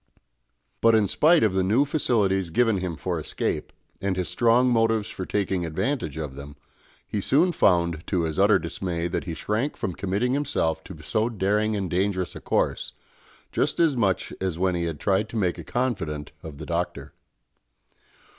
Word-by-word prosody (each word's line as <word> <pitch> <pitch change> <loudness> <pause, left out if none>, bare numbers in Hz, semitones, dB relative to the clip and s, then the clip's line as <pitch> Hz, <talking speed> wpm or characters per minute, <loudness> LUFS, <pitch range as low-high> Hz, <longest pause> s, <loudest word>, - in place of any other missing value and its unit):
But 115 0 +5
in 105 -2 +3
spite 160 - +4
of 105 -4 +3
the 95 - +2
new 110 +10 +3
facilities 100 - +1
given 115 +4 +2
him 90 -2 -3
for 85 +3 -3
escape, 75 - -3 0.3
and 95 -1 -1
his 90 - -1
strong 120 +2 +3
motives 115 -2 +2
for 95 - -6
taking 95 -3 0
advantage 85 - -2
of 75 -4 -4
them, 70 +1 -9 0.5
he 105 - -2
soon 160 - +3
found 85 - +2
to 90 -4 0
his 80 -2 -2
utter - - +6
dismay 85 -2 -3
that 90 - -3
he 85 -3 -4
shrank 110 - -2
from 95 - -3
committing 100 +8 -1
himself 85 - 0
to 90 -5 -10
so 110 +7 0
daring 105 0 +1
and 100 -2 -2
dangerous 95 0 0
a - - -8
course, - - -1 0.6
just - - 0
as 165 -5 +4
much 100 -6 0
as 95 -4 -1
when 95 +1 +1
he 85 -1 -1
had 80 -3 -4
tried 100 +5 +1
to 115 - -5
make 90 -5 0
a - - -6
confidant 80 - -2
of 75 -3 -9
the 80 - -7
Doctor. 85 +1 -3
95 Hz, 180 wpm, -25 LUFS, 85-115 Hz, 0.6 s, utter